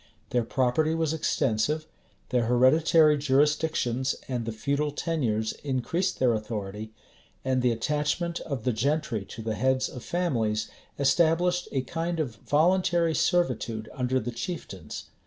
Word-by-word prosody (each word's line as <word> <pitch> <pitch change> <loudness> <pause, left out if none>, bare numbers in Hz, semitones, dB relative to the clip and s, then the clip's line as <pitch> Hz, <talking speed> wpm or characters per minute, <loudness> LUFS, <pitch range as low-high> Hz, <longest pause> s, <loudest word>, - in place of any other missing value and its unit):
Their 120 -1 +2
property 135 +6 +1
was 160 -1 0
extensive; 150 0 0 0.4
their 125 -2 +1
hereditary 150 +5 +5
jurisdictions 140 -2 +1
and 125 -3 -2
the - - -1
feudal 140 +6 -1
tenures 125 -9 -1
increased 160 +7 -1
their 125 -2 +3
authority; 105 -1 -4 0.5
and 130 -1 +1
the 125 - +3
attachment 150 +8 -1
of 135 -7 -5
the 125 - +1
gentry 120 -2 0
to 110 - -9
the 110 0 -1
heads 130 +4 +1
of 125 - -9
families 115 -12 -1 0.3
established 170 +5 +2
a 135 - 0
kind 165 +5 -3
of 125 -8 -2
voluntary 170 +3 +2
servitude 120 - 0
under 130 0 0
the 120 0 -4
chieftains. 115 - -6
130 Hz, 135 wpm, -27 LUFS, 115-160 Hz, 0.5 s, hereditary